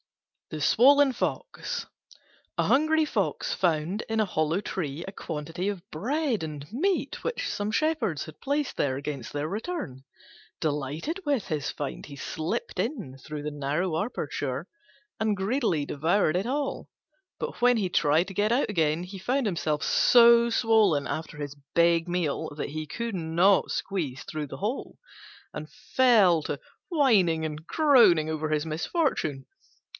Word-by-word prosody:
THE 155 Hz, -, -5 dB
SWOLLEN 270 Hz, -, +5 dB
FOX -, -, -3 dB, 0.7 s
A -, -, +3 dB
hungry 310 Hz, +3 st, +3 dB
Fox -, -, -1 dB
found 170 Hz, -, 0 dB
in 225 Hz, 0 st, 0 dB
a 215 Hz, -, +3 dB
hollow 160 Hz, -1 st, 0 dB
tree 165 Hz, -6 st, -4 dB
a -, -, -5 dB
quantity 165 Hz, +1 st, -4 dB
of 195 Hz, -2 st, -6 dB
bread 250 Hz, -, -1 dB
and 150 Hz, -2 st, -6 dB
meat, 370 Hz, +9 st, -1 dB
which 475 Hz, -, -2 dB
some 205 Hz, +1 st, -2 dB
shepherds 235 Hz, -, 0 dB
had 155 Hz, -1 st, -13 dB
placed 285 Hz, 0 st, -1 dB
there 130 Hz, -2 st, 0 dB
against 140 Hz, -3 st, -5 dB
their 145 Hz, +1 st, -2 dB
return. 200 Hz, -, -5 dB, 0.6 s
Delighted 155 Hz, -, -2 dB
with 280 Hz, -, 0 dB
his 150 Hz, -5 st, -2 dB
find 145 Hz, -2 st, -5 dB
he 145 Hz, -, -9 dB
slipped 160 Hz, +4 st, -4 dB
in 210 Hz, -, -3 dB
through 150 Hz, +1 st, -7 dB
the 150 Hz, -, -3 dB
narrow 150 Hz, +4 st, -1 dB
aperture 145 Hz, -, -4 dB, 0.5 s
and 215 Hz, -2 st, +1 dB
greedily 195 Hz, -, 0 dB
devoured 160 Hz, +4 st, +1 dB
it 190 Hz, +5 st, 0 dB
all. 280 Hz, +2 st, -2 dB, 0.5 s
But 475 Hz, -, -5 dB
when 245 Hz, 0 st, +5 dB
he 200 Hz, -4 st, 0 dB
tried 160 Hz, 0 st, +2 dB
to 195 Hz, -, -7 dB
get 205 Hz, +3 st, +1 dB
out 245 Hz, +1 st, +2 dB
again 165 Hz, -3 st, +1 dB
he 190 Hz, +2 st, -8 dB
found 255 Hz, +6 st, 0 dB
himself 160 Hz, -6 st, -1 dB
so 235 Hz, -1 st, +6 dB
swollen 220 Hz, -, +3 dB
after 160 Hz, -1 st, -5 dB
his 145 Hz, -1 st, -5 dB, 0.2 s
big 170 Hz, 0 st, +3 dB
meal 160 Hz, -3 st, -1 dB
that 150 Hz, -, -4 dB
he 155 Hz, 0 st, -5 dB
could 230 Hz, +2 st, -4 dB
not 175 Hz, +3 st, +3 dB
squeeze 150 Hz, -9 st, -3 dB
through 155 Hz, -2 st, -5 dB
the 135 Hz, -, -8 dB
hole, 215 Hz, -, -4 dB, 0.6 s
and 155 Hz, +1 st, -7 dB
fell 215 Hz, -10 st, +4 dB
to 145 Hz, -, -3 dB, 0.3 s
whining 200 Hz, -, +3 dB
and 155 Hz, 0 st, -6 dB
groaning 240 Hz, -, +5 dB
over 155 Hz, 0 st, -2 dB
his 155 Hz, 0 st, 0 dB
misfortune. 155 Hz, -, -1 dB
180 Hz, 150 wpm, -27 LUFS, 155-235 Hz, 0.7 s, so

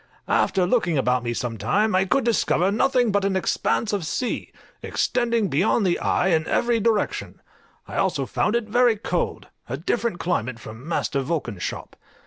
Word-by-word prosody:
After 185 Hz, -2 st, +2 dB
looking 175 Hz, -, +1 dB
about 125 Hz, -2 st, +1 dB
me 120 Hz, -, -2 dB
some 120 Hz, -2 st, -3 dB
time, 215 Hz, +1 st, +1 dB
I 190 Hz, +1 st, +3 dB
could 245 Hz, +8 st, +1 dB
discover 200 Hz, -5 st, +2 dB
nothing 245 Hz, +1 st, +2 dB
but 200 Hz, 0 st, +1 dB
an 195 Hz, -1 st, 0 dB
expanse 210 Hz, +3 st, 0 dB
of 200 Hz, -4 st, -1 dB
sea, 240 Hz, +10 st, -3 dB, 0.3 s
extending 235 Hz, -3 st, 0 dB
beyond 185 Hz, +7 st, +2 dB
the 175 Hz, -2 st, +1 dB
eye 180 Hz, -, +1 dB
in 160 Hz, -2 st, +1 dB
every 235 Hz, -1 st, +1 dB
direction; 220 Hz, -1 st, -1 dB, 0.5 s
I -, -, -6 dB
also -, -, +1 dB
found 210 Hz, -, 0 dB
it 235 Hz, -2 st, 0 dB
very 240 Hz, +1 st, +3 dB
cold, 180 Hz, -3 st, -3 dB, 0.2 s
a 130 Hz, -, -2 dB
different 225 Hz, +5 st, -1 dB
climate 130 Hz, -10 st, -2 dB
from 115 Hz, +7 st, -10 dB
Master 145 Hz, -4 st, 0 dB
Vulcan's 130 Hz, -, -3 dB
shop. -, -, -5 dB
190 Hz, 170 wpm, -23 LUFS, 155-230 Hz, 0.5 s, I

